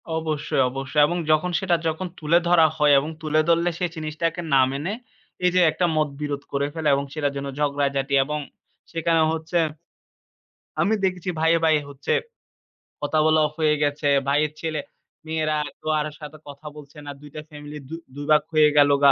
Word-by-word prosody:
অবশ্যই, 160 Hz, -4 st, -1 dB
অবশ্যই 135 Hz, +3 st, -1 dB
এবং 175 Hz, +3 st, -2 dB
যখন 155 Hz, +4 st, +2 dB
সেটা 180 Hz, -2 st, +1 dB
যখন 160 Hz, +4 st, -2 dB
তুলে 160 Hz, +2 st, +3 dB
ধরা 170 Hz, -2 st, +6 dB
হয় 150 Hz, -1 st, +4 dB
এবং 145 Hz, +3 st, -4 dB
তুলে 155 Hz, 0 st, +1 dB
ধরলে 170 Hz, +1 st, +3 dB
সে 180 Hz, -, +1 dB
জিনিসটাকে 160 Hz, +2 st, -3 dB
না 135 Hz, -, +6 dB
মেনে 145 Hz, +7 st, -3 dB, 0.5 s
এই 180 Hz, -, +4 dB
যে 180 Hz, -, +5 dB
একটা 180 Hz, -, 0 dB
মতবিরোধ 145 Hz, -1 st, -2 dB
করে 140 Hz, 0 st, 0 dB
ফেলে। 160 Hz, -2 st, -2 dB
এবং 140 Hz, 0 st, -2 dB
সেটার 145 Hz, -3 st, -1 dB
জন্য 140 Hz, 0 st, -4 dB
ঝগড়াঝাটি 140 Hz, -1 st, 0 dB
এবং 150 Hz, +2 st, -3 dB, 0.5 s
সেখানে 165 Hz, 0 st, +1 dB
হচ্ছে 160 Hz, +2 st, -3 dB, 1.2 s
আমি 215 Hz, -, +2 dB
দেখছি 185 Hz, -1 st, -1 dB
ভাইয়ে, 165 Hz, +1 st, +4 dB
ভাইয়ে, 155 Hz, -2 st, +3 dB
হচ্ছে 140 Hz, -1 st, -3 dB, 0.9 s
কথা 145 Hz, +1 st, -1 dB
বলা 155 Hz, 0 st, +4 dB
অফ 150 Hz, -, -13 dB
হয়ে 155 Hz, -1 st, +3 dB
গেছে। 145 Hz, 0 st, -1 dB, 0.2 s
ভাইয়ের 145 Hz, +2 st, +2 dB
ছেলে-মেয়েরা 155 Hz, 0 st, -4 dB, 0.2 s
কেউ 155 Hz, -, -6 dB
আরও 150 Hz, 0 st, -3 dB
সাথে 150 Hz, +1 st, -9 dB
কথা 140 Hz, +1 st, -12 dB
বলছে 150 Hz, -1 st, -13 dB
না। -, -, -7 dB
২ 145 Hz, -, -12 dB
টা 155 Hz, -, -5 dB
ফ্যামেলি 150 Hz, 0 st, -9 dB
দু -, -, -8 dB, 0.2 s
দুই 145 Hz, 0 st, -6 dB
ভাগ 150 Hz, -, +6 dB
হয়ে 155 Hz, -1 st, +6 dB
গেল 145 Hz, 0 st, +6 dB
গা। 140 Hz, -, +8 dB
155 Hz, 175 wpm, -23 LUFS, 145-160 Hz, 1.2 s, গা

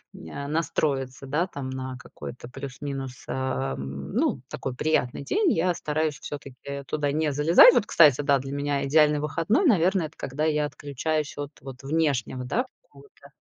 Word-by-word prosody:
н 140 Hz, -, -7 dB
настроиться, 140 Hz, -5 st, -1 dB
да, 160 Hz, +6 st, +1 dB
там, 135 Hz, -6 st, -6 dB
на 130 Hz, -1 st, -5 dB
какой-то 125 Hz, -1 st, -9 dB
плюс-минус, 135 Hz, 0 st, -6 dB
э, 70 Hz, -, -2 dB
ну, 70 Hz, -, -2 dB
такой 135 Hz, -4 st, -4 dB
приятный 140 Hz, -3 st, 0 dB
день. 390 Hz, -, +2 dB
Я 180 Hz, +2 st, +2 dB
стараюсь 155 Hz, -1 st, -1 dB
всё-таки 140 Hz, 0 st, -7 dB
туда 145 Hz, +1 st, -1 dB
не 155 Hz, 0 st, 0 dB
залезать. 150 Hz, +4 st, 0 dB, 0.2 s
Вот, 215 Hz, -, +3 dB
кстати, 145 Hz, -4 st, +5 dB
да, 140 Hz, -2 st, +3 dB
для 135 Hz, +1 st, -6 dB
меня 140 Hz, 0 st, -1 dB
идеальный 150 Hz, +1 st, +4 dB
выходной, 165 Hz, -, +1 dB
наверное, 185 Hz, -, +3 dB
это 150 Hz, -, -22 dB
когда 140 Hz, +4 st, -3 dB
я 150 Hz, -1 st, +2 dB
отключаюсь 145 Hz, +1 st, -3 dB
от, 145 Hz, 0 st, -5 dB
вот, 135 Hz, -1 st, -10 dB
внешнего, 140 Hz, -4 st, 0 dB
да, 240 Hz, -, 0 dB, 0.2 s
какого-то 445 Hz, -3 st, -18 dB
145 Hz, 155 wpm, -26 LUFS, 130-155 Hz, 0.2 s, кстати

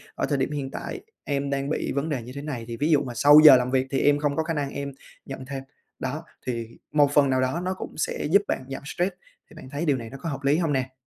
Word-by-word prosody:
"Ở -, -, 0 dB
thời 145 Hz, -, 0 dB
điểm 135 Hz, +2 st, -1 dB
hiện 140 Hz, -2 st, -4 dB
tại -, -, -5 dB, 0.2 s
em 140 Hz, -1 st, -2 dB
đang 140 Hz, 0 st, -1 dB
bị 155 Hz, -, -1 dB
vấn 140 Hz, +3 st, -1 dB
đề 140 Hz, -5 st, -2 dB
như 120 Hz, -, -9 dB
thế 140 Hz, -, -5 dB
này" 135 Hz, -6 st, -5 dB
thì 115 Hz, -, -5 dB
ví 150 Hz, +5 st, 0 dB
dụ 150 Hz, -, +5 dB
"mà 125 Hz, -, -6 dB
sau 145 Hz, +5 st, +8 dB
giờ 145 Hz, -, +12 dB
làm 125 Hz, 0 st, -1 dB
việc 130 Hz, 0 st, +1 dB
thì 135 Hz, -, +1 dB
em 145 Hz, 0 st, +3 dB
không 145 Hz, -1 st, 0 dB
có 160 Hz, -, +1 dB
khả 165 Hz, +1 st, -2 dB
năng 145 Hz, -2 st, -1 dB
em 140 Hz, 0 st, -4 dB, 0.3 s
nhận 135 Hz, -1 st, -7 dB
thêm." 135 Hz, 0 st, -6 dB, 0.4 s
Đó! 145 Hz, +5 st, -4 dB, 0.2 s
Thì 115 Hz, -2 st, -4 dB, 0.2 s
một 145 Hz, -2 st, +4 dB
phần 145 Hz, -2 st, +5 dB
nào 130 Hz, -1 st, +2 dB
đó 130 Hz, +7 st, 0 dB
nó 185 Hz, -, 0 dB
cũng 190 Hz, -, -8 dB
sẽ -, -, -2 dB
giúp 200 Hz, +3 st, +6 dB
bạn -, -, -1 dB
giảm 135 Hz, -, -5 dB
stress, 175 Hz, +5 st, -1 dB, 0.4 s
thì -, -, -16 dB
bạn -, -, -11 dB
thấy 145 Hz, +4 st, -2 dB
điều 145 Hz, -4 st, +2 dB
này 115 Hz, -2 st, -7 dB
nó 135 Hz, -, -9 dB
có 165 Hz, -, -3 dB
hợp 140 Hz, -1 st, -5 dB
lý 140 Hz, +2 st, +3 dB
hông 165 Hz, -4 st, 0 dB
nè? 130 Hz, -1 st, -2 dB
140 Hz, 290 wpm, -25 LUFS, 130-150 Hz, 0.4 s, giờ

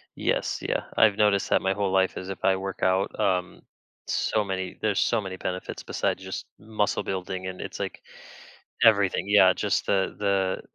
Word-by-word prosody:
Yes, -, -, -1 dB
yeah, -, -, -2 dB
I've 105 Hz, -2 st, +5 dB
noticed 105 Hz, -2 st, +2 dB
that -, -, +3 dB
my 95 Hz, 0 st, +1 dB
whole 100 Hz, -1 st, -1 dB
life 95 Hz, -1 st, +2 dB
is 95 Hz, -, -6 dB
if 95 Hz, -, -7 dB
I 95 Hz, -, +4 dB
work 95 Hz, 0 st, -5 dB
out, 95 Hz, +1 st, +1 dB
um, 90 Hz, -2 st, 0 dB, 0.5 s
so 110 Hz, -, 0 dB
many 95 Hz, -2 st, -4 dB
there's 105 Hz, -3 st, +1 dB
so 115 Hz, -2 st, +2 dB
many 95 Hz, -2 st, -6 dB
benefits 90 Hz, 0 st, -5 dB
besides -, -, -2 dB
just -, -, -5 dB
muscle 105 Hz, -1 st, -1 dB
building, 95 Hz, 0 st, -4 dB
and 95 Hz, 0 st, -6 dB
it's, -, -, -7 dB
like, -, -, -5 dB, 0.8 s
everything, 100 Hz, -4 st, +4 dB
yeah, 95 Hz, -3 st, +6 dB
just -, -, -1 dB
the 95 Hz, -1 st, 0 dB
the 100 Hz, -2 st, 0 dB
95 Hz, 180 wpm, -26 LUFS, 95-100 Hz, 0.8 s, yeah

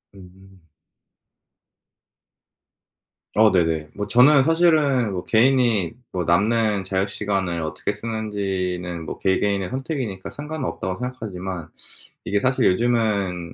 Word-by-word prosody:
음. 95 Hz, 0 st, -17 dB, 2.7 s
어 110 Hz, 0 st, +5 dB
네네. 80 Hz, -4 st, +1 dB
뭐 105 Hz, -, -3 dB
저는 130 Hz, +5 st, +5 dB
사실은 150 Hz, -, +3 dB
뭐 90 Hz, -1 st, -4 dB
개인이 115 Hz, -5 st, +3 dB, 0.2 s
뭐 90 Hz, -1 st, -2 dB
남는 105 Hz, +3 st, +2 dB
자유시간을 95 Hz, -2 st, -2 dB
어떻게 80 Hz, -, -3 dB
쓰는지는 95 Hz, -6 st, -3 dB
뭐 -, -, -5 dB
'개개인의 95 Hz, +1 st, 0 dB
선택이니까 130 Hz, -, -4 dB
상관은 150 Hz, -1 st, -6 dB
없다.'고 95 Hz, +3 st, -5 dB
생각하지만 95 Hz, -9 st, -5 dB, 0.6 s
이게 100 Hz, -, 0 dB
사실 130 Hz, +2 st, +1 dB
요즘은 100 Hz, -6 st, 0 dB
100 Hz, 255 characters per minute, -22 LUFS, 95-120 Hz, 2.7 s, 어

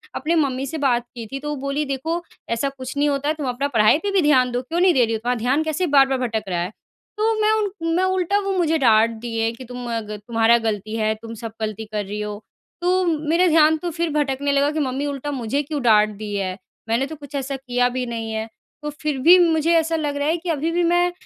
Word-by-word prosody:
अपने 330 Hz, +2 st, 0 dB
मम्मी 275 Hz, -4 st, 0 dB
से 295 Hz, +4 st, -5 dB
बात 245 Hz, -5 st, +1 dB
की 235 Hz, -2 st, -6 dB
थी, 270 Hz, +5 st, -6 dB
तो 295 Hz, +2 st, -5 dB
वो 295 Hz, -, -2 dB
बोली 275 Hz, +2 st, -1 dB
देखो 315 Hz, +5 st, -2 dB, 0.3 s
ऐसा 230 Hz, +4 st, 0 dB
कुछ 265 Hz, -1 st, -8 dB
नहीं 290 Hz, +1 st, +2 dB
होता, 285 Hz, +2 st, 0 dB
तुम 300 Hz, -4 st, -5 dB
अपना 255 Hz, +3 st, -1 dB
पढ़ाई 225 Hz, -1 st, +4 dB
पे 405 Hz, -, -1 dB
भी 390 Hz, -2 st, +3 dB
ध्यान 260 Hz, -5 st, +3 dB
दो, 245 Hz, +1 st, -1 dB
क्यों 325 Hz, +7 st, -3 dB
नहीं 365 Hz, 0 st, +5 dB
दे 255 Hz, -5 st, +4 dB
रही 225 Hz, -, -2 dB
हो? 220 Hz, -, -1 dB
तुम्हारा 245 Hz, +3 st, -1 dB
ध्यान 260 Hz, +7 st, +1 dB
कैसे 315 Hz, +3 st, -1 dB
बार-बार 270 Hz, -2 st, +4 dB
भटक 230 Hz, -4 st, -2 dB
रहा 175 Hz, -2 st, -1 dB
है? 180 Hz, +3 st, -3 dB, 0.5 s
तो 440 Hz, +1 st, +2 dB
मैं 425 Hz, 0 st, +4 dB
उन 400 Hz, -6 st, -1 dB
मैं 365 Hz, -, +2 dB
उल्टा 375 Hz, +1 st, +1 dB
वो 395 Hz, -, 0 dB
मुझे 325 Hz, -2 st, +2 dB
डाँट 225 Hz, -5 st, +4 dB
दिए 225 Hz, -1 st, -1 dB
कि 235 Hz, +3 st, -11 dB
तुम 245 Hz, 0 st, -7 dB
अ -, -, 0 dB
ग 210 Hz, 0 st, -5 dB
तुम्हारा 230 Hz, 0 st, +4 dB
गलती 215 Hz, -1 st, -3 dB
है 215 Hz, -1 st, +1 dB
तुम 230 Hz, 0 st, -8 dB
सब 225 Hz, 0 st, -7 dB
गलती 220 Hz, 0 st, -3 dB
कर 210 Hz, -1 st, -2 dB
रही 205 Hz, +2 st, -5 dB
हो। 210 Hz, 0 st, -6 dB, 0.4 s
तो 365 Hz, +1 st, +2 dB, 0.2 s
मेरा 345 Hz, +3 st, +4 dB
ध्यान 315 Hz, -1 st, +5 dB
तो 345 Hz, +3 st, -4 dB
फिर 335 Hz, +1 st, -1 dB
भटकने 285 Hz, -1 st, 0 dB
लगा 280 Hz, +1 st, +2 dB
कि 310 Hz, -, -2 dB
मम्मी 270 Hz, 0 st, -1 dB
उल्टा 285 Hz, 0 st, -4 dB
मुझे 265 Hz, +1 st, -1 dB
क्यों 295 Hz, 0 st, -4 dB
डाँट 215 Hz, -2 st, +5 dB
दी 210 Hz, 0 st, -6 dB
है, 190 Hz, -2 st, -2 dB, 0.3 s
मैंने 235 Hz, +4 st, +1 dB
तो 315 Hz, -, -7 dB
कुछ 285 Hz, -1 st, -11 dB
ऐसा 275 Hz, 0 st, -2 dB
किया 250 Hz, -2 st, 0 dB
भी 255 Hz, -, -1 dB
नहीं 230 Hz, -2 st, -4 dB
है। 220 Hz, 0 st, -3 dB, 0.4 s
तो 300 Hz, -, -2 dB
फिर 300 Hz, -2 st, -1 dB
भी 360 Hz, +2 st, +10 dB
मुझे 330 Hz, -1 st, +3 dB
ऐसा 325 Hz, 0 st, +1 dB
लग 295 Hz, -3 st, -2 dB
रहा 285 Hz, +1 st, -1 dB
है 325 Hz, +2 st, +2 dB
कि 345 Hz, +1 st, -6 dB
अभी 320 Hz, +1 st, 0 dB
भी 350 Hz, +1 st, +1 dB
मैं, 350 Hz, +1 st, +3 dB
275 Hz, 255 wpm, -22 LUFS, 230-320 Hz, 0.5 s, भी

